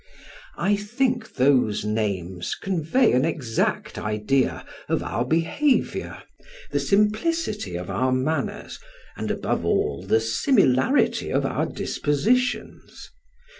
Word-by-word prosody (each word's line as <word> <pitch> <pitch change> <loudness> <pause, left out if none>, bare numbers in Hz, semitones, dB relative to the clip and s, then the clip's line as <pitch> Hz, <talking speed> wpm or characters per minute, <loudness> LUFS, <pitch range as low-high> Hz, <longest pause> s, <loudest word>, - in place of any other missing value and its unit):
I 205 +1 +2
think 240 +3 -1
those 125 -6 +2
names 95 -5 -2
convey 190 - +1
an 125 +1 +3
exact 140 -8 -1
idea 105 +5 0 0.2
of - - 0
our 115 - -1
behavior, 165 - 0 0.5
the - - +1
simplicity 210 - 0
of 90 +1 -5
our 130 +7 +1
manners, 135 +3 -2 0.4
and - - -4
above - - -1
all, 70 +3 0
the 100 +4 +2
similarity 130 - +2
of - - 0
our - - -1
dispositions. 235 - -1
140 Hz, 105 wpm, -24 LUFS, -, 0.5 s, an